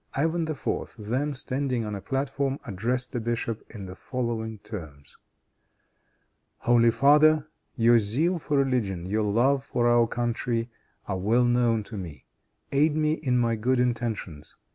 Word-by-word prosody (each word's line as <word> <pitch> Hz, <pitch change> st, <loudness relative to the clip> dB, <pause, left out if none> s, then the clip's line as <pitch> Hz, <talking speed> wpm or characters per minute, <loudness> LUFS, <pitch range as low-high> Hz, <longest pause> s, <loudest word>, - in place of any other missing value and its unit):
Ivan 160 Hz, +3 st, 0 dB
IV. 150 Hz, -3 st, -3 dB
then, 130 Hz, +7 st, -2 dB
standing 130 Hz, -2 st, -1 dB
on 105 Hz, -, -4 dB
a 100 Hz, -, -5 dB
platform, 135 Hz, +3 st, -1 dB
addressed 120 Hz, +4 st, -2 dB
the 120 Hz, -, -2 dB
bishop 115 Hz, -1 st, -3 dB
in 105 Hz, -4 st, -8 dB
the 90 Hz, -, -8 dB
following 115 Hz, 0 st, -3 dB
terms: 80 Hz, -10 st, -10 dB, 1.4 s
"Holy 120 Hz, -1 st, +4 dB
father! 150 Hz, +5 st, +5 dB, 0.3 s
Your 120 Hz, 0 st, +5 dB
zeal 150 Hz, -, 0 dB
for 145 Hz, -2 st, -1 dB
religion, 115 Hz, -10 st, 0 dB
your 105 Hz, +4 st, 0 dB
love 120 Hz, +7 st, +2 dB
for 120 Hz, -3 st, 0 dB
our 120 Hz, -1 st, +4 dB
country 120 Hz, 0 st, -2 dB, 0.4 s
are 95 Hz, -2 st, -2 dB
well 115 Hz, +6 st, +3 dB
known 120 Hz, -2 st, +2 dB
to 105 Hz, +1 st, -8 dB
me; 85 Hz, -6 st, -8 dB, 0.5 s
aid 150 Hz, +2 st, +3 dB
me 155 Hz, 0 st, +2 dB
in 130 Hz, -6 st, 0 dB
my 115 Hz, -1 st, +2 dB
good 125 Hz, +4 st, +1 dB
intentions. 115 Hz, -11 st, -2 dB
120 Hz, 145 wpm, -26 LUFS, 110-135 Hz, 1.4 s, father